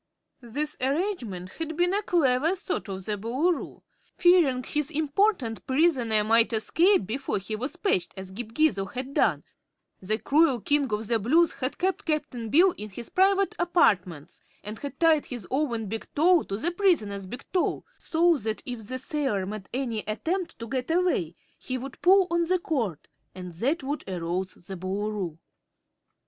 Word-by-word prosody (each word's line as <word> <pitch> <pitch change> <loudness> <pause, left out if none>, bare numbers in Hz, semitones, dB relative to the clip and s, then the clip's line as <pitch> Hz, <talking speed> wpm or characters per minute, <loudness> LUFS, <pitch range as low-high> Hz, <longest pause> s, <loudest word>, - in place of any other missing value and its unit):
This 290 +6 -2
arrangement 260 - -2
had 320 -1 -4
been 355 +1 +2
a 410 - +1
clever 320 -3 +2
thought 365 - -4
of 190 -1 -6
the 210 -1 -2
Boolooroo. 265 - -1 0.3
Fearing 335 -8 +4
his 295 +3 -1
important 305 - 0
prisoner 260 -7 +3
might 225 +2 +4
escape 335 - +3
before 260 +5 -2
he 200 +3 -4
was 255 +10 -4
patched, 190 - -1
as 190 0 -7
Ghip 220 +3 -7
Ghisizzle 210 -10 +1
had 260 +2 -5
done, - - +2 0.6
the 210 +3 -1
cruel 285 +1 +3
King 285 +2 +1
of 210 +1 -1
the 230 +1 +1
Blues 320 +11 +3
had 255 +1 -2
kept 375 +1 -1
Cap'n 255 -7 -2
Bill 355 - +5
in 210 +1 -6
his 235 +4 -9
private 390 +1 +2
apartments 185 - +1 0.2
and 210 +2 -6
had 280 -2 -7
tied 320 -3 +4
his 240 -7 -6
own 255 -5 0
big 220 +2 -5
toe 340 +3 +5
to 195 - -4
the 335 +11 -1
prisoner's 220 - +1
big 245 +7 -8
toe, 365 - 0
so 335 0 +2
that 220 -3 -4
if 235 -4 -6
the 255 - -3
sailor 260 -7 -1
made 200 -1 -7
any 245 -4 -2
attempt 335 - -2
to 230 - -7
get 255 +2 -3
away 325 - +1 0.2
he 255 - -4
would 265 +1 -8
pull 380 +1 +6
on 340 0 +2
the 370 +2 +2
cord, 235 - -3 0.3
and 180 -2 -8
that 270 - -1
would 285 +3 -3
arouse 180 +1 -3
the 190 - -6
Boolooroo. 190 -2 -3
255 Hz, 170 wpm, -26 LUFS, 210-330 Hz, 0.6 s, pull